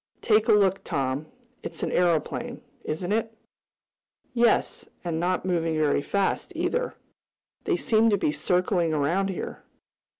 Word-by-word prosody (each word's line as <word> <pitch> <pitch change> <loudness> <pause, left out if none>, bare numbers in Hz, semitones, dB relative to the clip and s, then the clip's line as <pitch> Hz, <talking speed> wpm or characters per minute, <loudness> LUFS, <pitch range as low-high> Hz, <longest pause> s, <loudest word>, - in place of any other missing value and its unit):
Take 215 -1 +3
a - - +6
look, 195 -2 +3
Tom. 135 +2 -2 0.3
It's - - -6
an - - -1
aeroplane; 170 -4 0 0.2
isn't 175 +5 -3
it?" 225 +1 -1 1.0
"Yes, 235 -2 +2 0.2
and 165 -2 -2
not 180 +2 0
moving 165 -3 0
very 150 -2 +2
fast, 200 +6 -1
either. - - -1 0.7
They 375 -4 +1
seem 225 -5 +3
to 205 - +3
be 150 - +1
circling 180 -1 +1
around 170 +7 +1
here." 185 - -5
180 Hz, 135 wpm, -26 LUFS, 160-215 Hz, 1.0 s, a